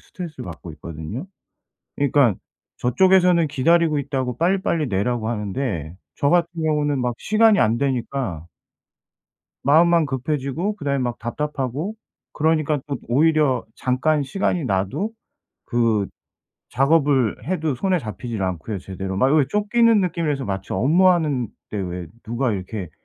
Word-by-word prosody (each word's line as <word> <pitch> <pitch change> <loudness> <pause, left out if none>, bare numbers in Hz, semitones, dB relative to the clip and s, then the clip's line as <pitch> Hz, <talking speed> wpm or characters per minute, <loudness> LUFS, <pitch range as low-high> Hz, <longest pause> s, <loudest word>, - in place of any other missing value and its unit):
스트레스를 160 -8 -8
받고 85 0 -8
있거든요. 80 - -7 0.7
그러니까 140 -6 +3 0.4
저쪽에서는 180 +5 +4
"기다리고 155 +2 +2
있다."고 130 -3 -3
"빨리빨리 170 -3 +1
내라."고 110 +2 -1
하는데 100 - -3 0.2
저 140 - +1
같은 175 0 +3
경우는 150 -3 +1
막 125 -1 -1
시간이 215 -1 +4
안 110 +2 +3
되니까 125 - -2 1.2
마음만 165 +3 +5
급해지고 140 +7 -2
그다음에 140 -7 -1
막 120 -1 -2
답답하고 150 - -3 0.4
그러니까 155 -1 +1
또 140 -2 -2
오히려 150 +1 +2
잠깐 145 +4 +1
시간이 170 +2 -1
나도 100 - -1 0.5
그 115 -5 +1 0.6
작업을 135 -3 +2
해도 160 -3 -1
손에 185 +8 +1
잡히질 110 -3 -5
않고요 95 +3 -3
제대로. 95 +1 -5
막 130 +6 +3
왜 150 -3 +4
쫓기는 220 +2 +3
느낌이라서 160 -6 -1
마치 95 -1 -4
업무하는데 150 - +3 0.2
왜 90 -4 -4 0.2
누가 120 +2 -1
이렇게 95 -2 -5
140 Hz, 320 characters per minute, -22 LUFS, 115-160 Hz, 1.2 s, 마음만